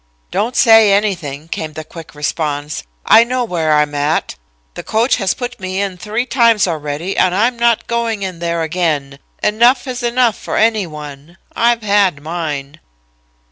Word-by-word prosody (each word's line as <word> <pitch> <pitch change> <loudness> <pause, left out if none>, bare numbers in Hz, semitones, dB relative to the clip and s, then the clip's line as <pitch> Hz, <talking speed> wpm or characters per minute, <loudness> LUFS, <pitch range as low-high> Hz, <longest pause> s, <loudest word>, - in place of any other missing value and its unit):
"'Don't 235 +4 -1
say 225 -2 +6
anything,' 175 -8 -1
came 160 -2 -5
the 155 - -7
quick 155 -3 -12
response, 150 0 -3 0.2
'I 225 - +7
know 250 +1 -1
where 170 -8 -1
I 150 0 +5
am 145 0 -7
at. 145 +2 -1 0.4
The - - -7
coach 225 +4 +1
has 195 -5 0
put 245 -1 -6
me 185 0 -4
in 200 -2 -2
three 210 +7 -3
times 230 -5 +3
already 155 +2 -3
and 185 -1 +2
I'm 230 +5 +2
not 235 -1 +1
going 230 -3 -2
in 185 -3 -5
there 170 -1 -1
again. 155 -5 -2 0.2
Enough 235 +6 +3
is 255 -1 -5
enough 240 -2 +2
for - - -4
any 220 -4 +2
one. 150 +1 -10 0.2
_I've 235 -1 +2
had 200 -6 +2
mine. 155 -2 -5
185 Hz, 170 wpm, -16 LUFS, 155-230 Hz, 0.4 s, I